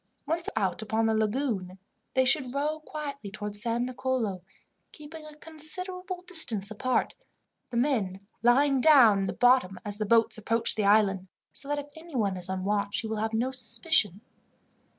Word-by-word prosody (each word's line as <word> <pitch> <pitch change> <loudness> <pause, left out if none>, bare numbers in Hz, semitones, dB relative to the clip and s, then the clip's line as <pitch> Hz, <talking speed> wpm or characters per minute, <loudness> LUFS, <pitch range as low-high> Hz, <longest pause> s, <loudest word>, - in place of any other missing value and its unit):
Once 330 +3 -1
out 195 -4 -1
upon 220 +1 0
the 225 - +2
lagoon, 215 -4 -1 0.4
they 260 0 +4
should 260 -1 +2
row 300 +2 -1
quietly 290 -7 -7
towards 205 0 -1
San 235 +1 0
Nicolo, 250 -6 -2 0.5
keeping 305 +1 -11
a 305 - -12
considerable 360 +4 -5
distance 235 - -1
apart, 255 +4 -1 0.6
the 240 - -4
men 225 -8 0 0.2
lying 265 +3 +3
down 245 -9 +6
in 195 - -1
the - - -3
bottom 245 -7 +3
as 205 0 0
the 215 - -1
boats 230 0 +3
approach 230 +2 +1
the 215 - -1
island, 200 -2 +3 0.2
so 275 - +1
that 290 0 -1
if 290 - -4
anyone 260 - -2
is 180 0 -4
on 190 0 -3
watch 205 0 0
he 225 - -5
will 220 0 -3
have 220 +1 -1
no 245 +4 0
suspicion. 255 - +1
235 Hz, 170 wpm, -28 LUFS, 205-290 Hz, 0.6 s, down